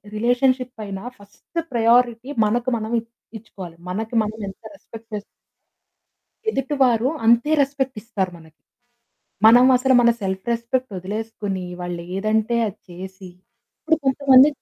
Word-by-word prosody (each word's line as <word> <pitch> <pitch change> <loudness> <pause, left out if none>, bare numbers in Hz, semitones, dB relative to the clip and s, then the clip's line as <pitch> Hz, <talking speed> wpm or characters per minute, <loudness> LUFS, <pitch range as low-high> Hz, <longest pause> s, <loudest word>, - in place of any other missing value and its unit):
Relationship 245 +1 +1
అయినా 195 -1 -6
first 205 +11 -8
priority 235 +1 +2 0.2
మనకు 240 +4 0
మనం 220 0 -5
ఇ - - -7 0.4
ఇచ్చుకోవాలి. 185 -6 -11
మనకి 220 +5 -4
మనం 215 +1 -5
ఎంత 190 - -13
రెస్పెక్ట్ 225 -5 -13
చేస్ 205 -1 -4 1.3
ఎదుటివారు 265 - +1 0.2
అంతే 235 +6 +4
రెస్పెక్ట్ 270 -2 -2
ఇస్తారు 205 -6 -2
మనకి. 160 -1 -18 0.9
మనం 245 +3 +8
అసలు 260 +1 +2
మన 235 - +5
సెల్ఫ్ 190 -1 -3
రెస్పెక్ట్ 235 +2 -2
వదిలేసుకొని 205 0 -4 0.2
వాళ్లేదంటే 195 +6 -1
అది 195 - -10
చేసి, 185 +1 -9 0.5
ఇప్పుడు 320 0 +2
కొంతమంది 270 0 +6
225 Hz, 120 wpm, -22 LUFS, 195-255 Hz, 1.3 s, మనం